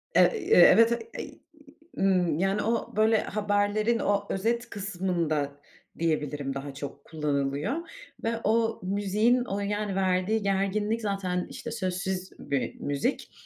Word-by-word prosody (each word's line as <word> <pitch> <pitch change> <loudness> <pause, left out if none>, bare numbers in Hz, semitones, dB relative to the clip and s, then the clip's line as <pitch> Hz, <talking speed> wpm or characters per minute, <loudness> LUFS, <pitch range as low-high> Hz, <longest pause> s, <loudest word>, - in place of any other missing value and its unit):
Eee, - - +7
ııı, - - +4 0.3
evet, 230 +1 +6
eee, 450 - -5 0.6
ııı, - - +1 0.2
ımm, 165 -2 0
yani 195 +2 +1
o 230 +1 -1
böyle 220 +1 +4
haberlerin 210 +2 +1
o 205 -1 +1
özet 230 +5 -1
kısmında 175 -7 -1 0.5
diyebilirim 150 -4 -1
daha 135 +1 -6
çok 140 0 -8
kullanılıyor 145 - -1 0.5
ve 230 0 0
o 225 +1 +1
müziğin 205 +6 +2
o 200 -3 -3
yani 205 0 -2
verdiği 190 +3 +1
gerginlik 200 +3 0
zaten 195 -4 -2
işte - - -7
sözsüz 185 0 -3
bir 140 -2 -3
müzik. 140 -1 -2
195 Hz, 130 wpm, -27 LUFS, 165-215 Hz, 0.6 s, Eee